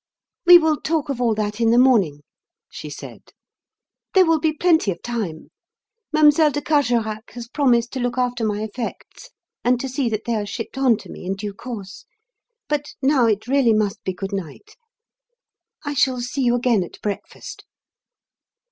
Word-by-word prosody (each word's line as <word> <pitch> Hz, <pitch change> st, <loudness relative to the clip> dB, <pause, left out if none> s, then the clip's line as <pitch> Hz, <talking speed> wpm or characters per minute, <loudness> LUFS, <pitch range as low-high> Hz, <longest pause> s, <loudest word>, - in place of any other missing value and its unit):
"We 355 Hz, 0 st, +11 dB
will 315 Hz, -3 st, +1 dB
talk 315 Hz, -2 st, -1 dB
of 260 Hz, -3 st, -3 dB
all 230 Hz, -3 st, +2 dB
that 210 Hz, +1 st, -3 dB
in 230 Hz, -, +4 dB
the 235 Hz, -, +4 dB
morning," 200 Hz, -, +3 dB, 0.5 s
she -, -, -8 dB
said. -, -, -10 dB, 0.9 s
"There 375 Hz, -1 st, +7 dB
will 325 Hz, -1 st, +3 dB
be 315 Hz, +1 st, +1 dB
plenty 320 Hz, -, +2 dB
of 170 Hz, -3 st, -4 dB
time. 215 Hz, -10 st, -4 dB, 0.6 s
Mlle. 310 Hz, -1 st, +6 dB, 0.2 s
de 290 Hz, -, -2 dB
Carjorac 240 Hz, -7 st, 0 dB
has 240 Hz, -1 st, -8 dB
promised 240 Hz, -3 st, +1 dB
to 265 Hz, -, -3 dB
look 245 Hz, 0 st, -2 dB
after 245 Hz, -2 st, -1 dB
my 210 Hz, -1 st, -1 dB
effects 235 Hz, -, -7 dB, 0.3 s
and 245 Hz, 0 st, +2 dB
to 270 Hz, -, -3 dB
see 260 Hz, -1 st, -1 dB
that 215 Hz, -1 st, -3 dB
they 235 Hz, -, -1 dB
are 210 Hz, -2 st, -1 dB
shipped 225 Hz, +5 st, -6 dB
on 260 Hz, -4 st, +3 dB
to -, -, -13 dB
me -, -, -10 dB
in 190 Hz, +2 st, -2 dB
due 205 Hz, +1 st, -6 dB
course. 215 Hz, -2 st, -8 dB, 0.6 s
But 295 Hz, 0 st, -3 dB
now 265 Hz, -3 st, +4 dB
it 215 Hz, 0 st, 0 dB
really 255 Hz, -2 st, +3 dB
must 215 Hz, 0 st, -1 dB
be 190 Hz, -, -2 dB
good 195 Hz, +2 st, -6 dB
night. 195 Hz, -, -7 dB, 1.1 s
I 290 Hz, -, -2 dB
shall 260 Hz, -2 st, +1 dB
see 245 Hz, +3 st, -3 dB
you 240 Hz, 0 st, +3 dB
again 235 Hz, -5 st, +2 dB
at 175 Hz, -, -11 dB
breakfast." 205 Hz, -1 st, -6 dB
240 Hz, 175 wpm, -21 LUFS, 215-280 Hz, 1.1 s, We